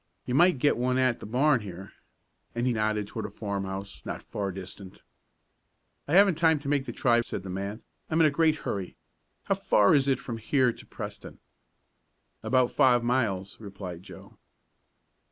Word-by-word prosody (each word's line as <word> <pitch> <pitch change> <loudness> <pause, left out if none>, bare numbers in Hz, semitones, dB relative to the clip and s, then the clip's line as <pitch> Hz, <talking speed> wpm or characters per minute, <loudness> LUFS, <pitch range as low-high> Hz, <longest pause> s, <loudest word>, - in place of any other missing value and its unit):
"You 125 - -3
might 175 +3 +5
get 145 +1 +2
one 125 +1 +1
at 130 -2 +2
the - - -8
barn 135 +4 +3
here," 95 -2 -9 0.6
and 120 +1 -1
he 125 - +2
nodded 110 -1 0
toward 105 +1 -5
a - - -10
farmhouse 100 -1 -5
not - - -6
far 100 -1 -4
distant. 95 0 -10 1.0
"I 145 - -2
haven't 190 -3 +5
time 160 -2 +4
to 145 - -8
make 140 -1 +1
the - - -3
try," 120 -2 +2
said 100 - -6
the 95 - -6
man. 100 +4 -5 0.3
"I'm 160 - +1
in 165 - +6
a 150 - +4
great 155 +1 +3
hurry. 95 -3 -4 0.5
How - - +1
far 105 -1 +3
is 140 -2 +3
it 135 -2 +3
from 115 - -6
here 125 +2 +2
to - - -14
Preston?" - - -8 1.0
"About 130 -1 +2
five 125 -2 +4
miles," 105 -6 -1
replied 95 -5 -8
Joe. - - -14
120 Hz, 175 wpm, -27 LUFS, 100-135 Hz, 1.0 s, in